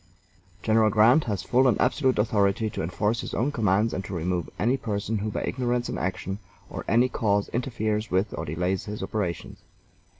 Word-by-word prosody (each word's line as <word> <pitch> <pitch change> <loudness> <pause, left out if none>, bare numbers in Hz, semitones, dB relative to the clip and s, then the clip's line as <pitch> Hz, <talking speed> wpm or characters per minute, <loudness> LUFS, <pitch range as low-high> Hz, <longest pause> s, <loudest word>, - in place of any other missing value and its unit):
General 110 -1 +4
Grant 115 +9 +5
has 100 -5 -2
full 130 +2 +3
and 125 - +2
absolute 130 +1 +2
authority 105 0 +1
to - - -4
enforce 105 +7 -1
his - - -5
own 130 +5 +1
commands 110 -2 +1
and 95 - -3
to 95 - -5
remove 85 0 -2
any 115 +9 +2
person 110 -3 -2
who 105 +2 -2
by - - -3
ignorance 125 -1 -1
in - - -3
action 95 +1 -3 0.3
or - - -5
any 120 +3 +4
cause 105 -5 0
interferes 110 -3 -2
with 95 +3 0
or - - -4
delays 90 +4 -2
his 105 0 -5
operations. 90 -7 -3
105 Hz, 180 wpm, -26 LUFS, 95-120 Hz, 0.3 s, Grant